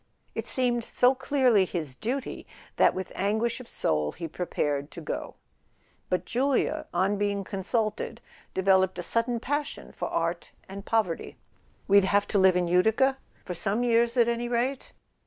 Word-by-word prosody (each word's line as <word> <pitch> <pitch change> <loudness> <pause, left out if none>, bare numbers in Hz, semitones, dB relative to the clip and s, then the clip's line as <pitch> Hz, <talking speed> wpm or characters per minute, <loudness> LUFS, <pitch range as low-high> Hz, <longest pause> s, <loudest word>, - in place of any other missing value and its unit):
It - - -4
seemed 245 -2 0
so 250 +3 +3
clearly 255 -6 +3
his 165 -7 -4
duty 255 - -4 0.3
that, - - +4
with 185 0 -5
anguish 220 +4 0
of 255 - -11
soul, 75 -1 0
he 165 -1 -5
prepared 145 -4 -2
to 170 - -9
go; 155 - -5 0.7
but 180 - 0
Julia, 265 +2 0
on 190 +3 +1
being 200 -1 0
consulted, 215 +4 -2 0.4
developed 190 -1 +3
a 175 - -4
sudden 230 +5 0
passion 290 +4 -3
for - - -4
art - - -2 0.2
and 195 +1 -9
poverty. 215 -7 -1 0.5
"We'd 200 0 +6
have 200 +1 +2
to 200 - +2
live 190 -1 +5
in 180 -1 +1
Utica—for 220 +4 +1
some 205 +6 -1
years 235 0 +2
at 235 -1 +5
any 235 0 -1
rate?" 250 +3 -1
205 Hz, 155 wpm, -27 LUFS, 185-240 Hz, 0.7 s, We'd